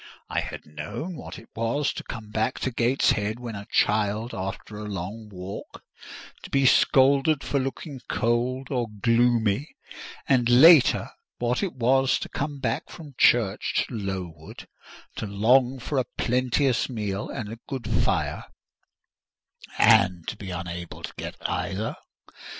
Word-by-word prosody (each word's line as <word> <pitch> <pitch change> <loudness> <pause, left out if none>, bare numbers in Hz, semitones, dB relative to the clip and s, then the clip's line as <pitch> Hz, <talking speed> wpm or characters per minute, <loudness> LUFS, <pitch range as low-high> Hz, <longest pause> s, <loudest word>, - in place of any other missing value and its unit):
I - - +1
had - - -6
known 75 - -6
what - - -8
it 115 - -13
was 115 +6 0
to - - -6
come 110 -4 -8
back 110 +4 0
to 130 - -1
Gateshead 115 -3 +1
when 120 -2 -6
a 100 0 -8
child 105 +2 +1
after 95 +2 -5
a 105 0 -6
long 100 +3 -6
walk, 95 0 -8 0.6
to - - -10
be 135 -1 +2
scolded 135 +3 +4
for 140 - 0
looking 135 +1 -5
cold 125 +3 0
or 125 -3 0
gloomy; 115 - +1 0.5
and 125 -4 +3
later, 145 +4 +7 0.3
what 120 +1 0
it 190 -7 -2
was 130 +2 +3
to - - -6
come 145 0 -4
back 130 +3 -2
from 155 -5 -11
church 110 -5 +3
to - - -11
Lowood, 95 -7 -6 0.5
to - - -3
long 125 +6 +3
for 135 +3 -2
a 125 - 0
plenteous 125 +2 +1
meal 105 -4 -3
and 110 -2 -5
a 115 - -10
good 130 -5 -5
fire, 115 - 0 1.3
and 90 -4 +4
to - - -5
be 100 -2 -8
unable 85 -1 -6
to - - -6
get - - -6
either. 100 +4 -2
115 Hz, 145 wpm, -25 LUFS, 105-130 Hz, 1.3 s, later